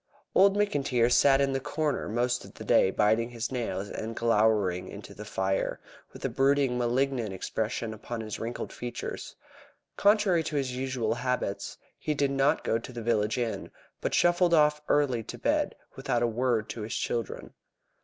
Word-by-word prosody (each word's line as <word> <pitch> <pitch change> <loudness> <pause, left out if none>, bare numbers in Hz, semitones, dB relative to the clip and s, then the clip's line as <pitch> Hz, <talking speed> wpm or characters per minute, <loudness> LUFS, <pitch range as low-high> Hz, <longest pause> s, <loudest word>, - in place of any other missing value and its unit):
Old 195 +1 +5
McIntyre 140 - +1
had 120 +1 +4
sat 140 -1 +5
in 135 -1 +1
the 135 - 0
corner 150 -1 -2
most 120 +2 0
of - - -14
the - - -8
day - - +4
biting 110 +4 +2
his 120 0 -4
nails 105 -6 -2
and 115 +1 -5
glowering 105 -5 +2
into - - -9
the - - -9
fire, 95 0 -1 0.3
with - - -8
a - - +3
brooding, 135 -1 +2
malignant 125 -2 0
expression 110 +4 -3
upon 115 +2 -6
his 110 -1 -5
wrinkled 115 +1 -5
features. 120 0 -6 0.6
Contrary 200 -4 +4
to 155 -1 -4
his 130 -3 -1
usual 125 -4 -1
habits, 120 -5 -2 0.2
he 150 - -1
did 140 -1 +1
not 140 +3 +2
go 115 - +1
to 115 - -9
the 120 -2 -6
village 110 -1 +1
inn, 120 -2 -2 0.3
but - - 0
shuffled 175 0 +4
off 150 -1 +4
early 135 -5 +2
to 110 - -8
bed - - 0 0.2
without 120 0 0
a - - +3
word 115 -1 0
to 115 - -6
his 105 +1 -4
children. 115 -3 -3
120 Hz, 175 wpm, -28 LUFS, 110-140 Hz, 0.6 s, Old